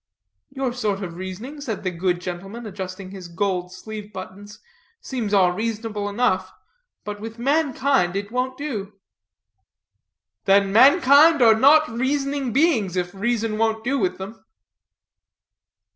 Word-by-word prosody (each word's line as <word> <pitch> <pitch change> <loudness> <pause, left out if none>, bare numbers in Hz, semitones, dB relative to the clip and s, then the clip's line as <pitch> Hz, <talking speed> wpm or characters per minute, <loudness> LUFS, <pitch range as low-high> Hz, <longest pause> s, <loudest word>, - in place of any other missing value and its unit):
"Your 265 -2 -3
sort 210 -5 -2
of 175 -3 -6
reasoning," 195 - -7
said 225 -8 -4
the 185 - -1
good 175 0 -1
gentleman, 195 +7 -7
adjusting 190 -1 -7
his 190 -3 -9
gold 180 +1 -2
sleeve 210 +2 -9
buttons, 205 +2 -10 0.4
"seems 235 -6 -4
all 190 -3 +4
reasonable 215 0 -3
enough, 245 +5 0 0.5
but 205 0 -6
with 225 +2 -8
mankind 270 - +1
it 200 +1 -4
wont 255 +1 -2
do." 215 -9 -5 1.5
"Then 195 0 +4
mankind 285 - +6
are 225 -1 +7
not 290 +7 +5
reasoning 275 +2 -1
beings, 235 - +2
if 180 0 -2
reason 220 +1 -1
wont 220 0 0
do 270 +3 0
with 185 -3 -1
them." 200 +4 -9
215 Hz, 130 wpm, -22 LUFS, 195-255 Hz, 1.5 s, are